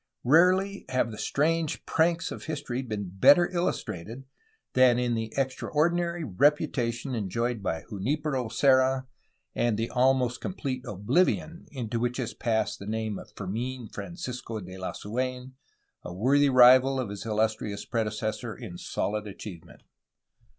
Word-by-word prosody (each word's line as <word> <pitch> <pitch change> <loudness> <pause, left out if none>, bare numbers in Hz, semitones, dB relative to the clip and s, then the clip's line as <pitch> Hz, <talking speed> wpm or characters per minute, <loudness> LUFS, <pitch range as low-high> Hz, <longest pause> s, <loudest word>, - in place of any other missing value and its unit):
Rarely 185 +7 +4
have 130 -2 0
the 110 - -8
strange 160 +2 0
pranks 165 +1 +1
of - - -7
history 135 -5 -3
been 105 -6 -4
better 175 - +7
illustrated 125 - -3 0.5
than 130 -2 +5
in 125 -1 0
the 115 -1 -3
extraordinary 170 +6 0
reputation 130 - +1
enjoyed 115 +2 -2
by 80 -4 -2
Junipero 130 +5 -2
Serra 130 +1 +3 0.5
and 120 -3 +1
the 115 +1 -2
almost 125 -1 +2
complete 135 -8 -4
oblivion 135 - 0
into 120 -4 -3
which 120 +1 -1
has 125 -4 -3
passed 110 -2 -1
the 100 - -8
name 110 -1 -2
of - - -12
Fermin 115 +4 -4
Francisco 125 -10 -6
de 90 -2 -10
Lasu^n, 125 +7 -4 0.5
a - - -8
worthy 135 +10 +3
rival 130 +1 +7
of 125 -5 -2
his 100 -1 -6
illustrious 110 -1 -1
predecessor 110 0 -2
in 90 -1 -9
solid 105 +1 -2
achievement. 95 -4 -10
125 Hz, 130 wpm, -27 LUFS, 110-140 Hz, 0.5 s, better